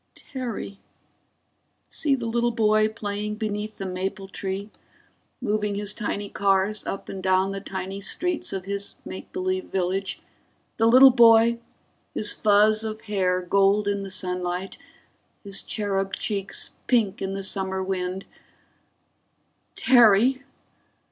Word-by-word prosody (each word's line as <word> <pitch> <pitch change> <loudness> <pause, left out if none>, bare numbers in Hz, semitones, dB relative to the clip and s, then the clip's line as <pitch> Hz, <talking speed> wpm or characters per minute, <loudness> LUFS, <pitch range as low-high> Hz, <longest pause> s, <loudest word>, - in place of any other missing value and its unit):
_ - - -47
Terry! 240 -7 -6 1.1
See 285 -3 +1
the 240 -3 -5
little 235 +1 +1
boy 215 -2 +3
playing 210 -1 -4
beneath 210 0 -4
the 195 - -5
maple 190 +1 -4
tree, 195 +2 -5 0.7
moving 210 -3 -1
his 205 0 -1
tiny 205 -2 -3
cars 200 +1 +1
up 195 - -5
and 190 - -6
down 190 +1 +2
the 195 0 -5
tiny 190 0 -6
streets 355 - -1
of 190 -1 -4
his 200 0 -3
make - - -8
believe 370 0 -2
village; 190 +1 -2 0.6
the 225 - +3
little 260 +3 +8
boy, 235 -1 +6 0.6
his 210 - +3
fuzz 215 +1 +3
of 220 0 -5
hair 185 -3 0
gold 200 +3 +2
in 200 0 0
the 195 - -6
sunlight, 180 0 -2 0.7
his 200 -1 +1
cherub 195 -2 -2
cheeks 200 -2 -2 0.2
pink 225 -6 +1
in 195 0 -3
the 195 - -4
summer 190 -1 -1
wind 185 0 -3 1.5
_Terry! 245 +1 +5
200 Hz, 130 wpm, -24 LUFS, 195-220 Hz, 1.5 s, little